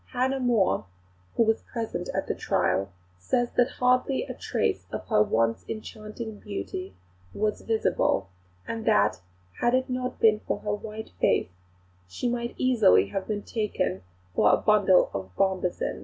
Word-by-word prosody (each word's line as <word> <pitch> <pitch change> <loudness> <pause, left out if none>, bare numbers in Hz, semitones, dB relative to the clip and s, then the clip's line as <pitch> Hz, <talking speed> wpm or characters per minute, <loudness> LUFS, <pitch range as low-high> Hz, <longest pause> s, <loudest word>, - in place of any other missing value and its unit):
Hannah 260 +2 +1
More, 235 - +2 0.5
who - - +4
was 225 0 +1
present 230 -2 -4
at - - -2
the - - -1
trial, 95 +1 0 0.3
says 240 - 0
that 245 - +3
hardly 255 - +2
a - - -6
trace - - -1
of - - -5
her 215 -2 +4
once 115 - +1
enchanting 215 0 -7
beauty 190 - -6 0.4
was 210 0 -1
visible; 220 - +1 0.4
and 225 -1 -4
that, 100 -2 +3 0.4
had 240 +1 +3
it 260 0 0
not 250 0 -3
been 215 -1 +5
for - - -3
her 210 - -1
white 215 +1 -6
face, - - +2 0.6
"she 90 - -3
might 235 0 -2
easily 210 - +4
have 195 - -3
been 205 -1 -2
taken 205 - -2 0.3
for 105 +4 +4
a - - +5
bundle 205 -4 +4
of 95 -1 -4
bombasin." 185 -2 0
215 Hz, 155 wpm, -27 LUFS, 185-240 Hz, 0.6 s, been